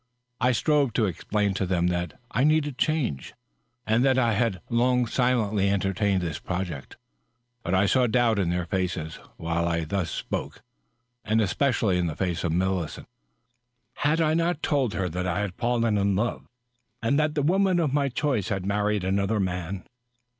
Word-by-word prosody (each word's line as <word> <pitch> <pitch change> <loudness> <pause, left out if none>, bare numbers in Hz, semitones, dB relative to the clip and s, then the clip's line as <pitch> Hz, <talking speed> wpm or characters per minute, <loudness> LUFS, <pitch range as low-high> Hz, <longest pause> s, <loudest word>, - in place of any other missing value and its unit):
I 125 0 +3
strove 140 +1 +2
to 110 - +2
explain 100 +2 -1
to 95 0 -1
them 90 -1 +1
that 90 -2 -3
I 125 - +1
needed 150 -3 +2
change, 135 - -1 0.5
and 110 +3 +2
that 135 -1 +3
I 120 -3 +3
had 110 -3 0
long 125 +1 +2
silently 110 -5 +1
entertained 100 0 +1
this 80 -4 -3
project; 90 -7 -5 0.6
but 90 -2 -1
I 95 +2 +4
saw 130 +6 +3
the 125 - +3
doubt 115 -2 +2
in 90 -4 +1
their 90 0 -1
faces 90 -3 -3 0.2
while 85 +1 -1
I 85 -1 0
thus 90 0 -2
spoke - - -5 0.3
— 125 +1 -50
and 110 +1 +1
especially 110 -2 +1
in 90 - 0
the 80 - -4
face 90 -1 -2
of 85 - 0
Millicent. 90 -2 -1 0.9
Had 150 +3 +1
I 155 -1 +2
not 165 -1 0
told 135 - +1
her 90 0 -1
that 90 +2 -3
I 90 +3 0
had 100 -3 -3
fallen 115 -1 +1
in 100 0 +1
love, 120 +5 -2 0.6
and 140 +6 +2
that 155 -1 +1
the 145 - +1
woman 185 +3 +3
of 150 -5 0
my 140 -1 +2
choice 130 -6 -1
had 95 -2 -2
married 105 0 0
another 100 +3 0
man 90 0 -3
105 Hz, 180 wpm, -26 LUFS, 90-125 Hz, 0.9 s, I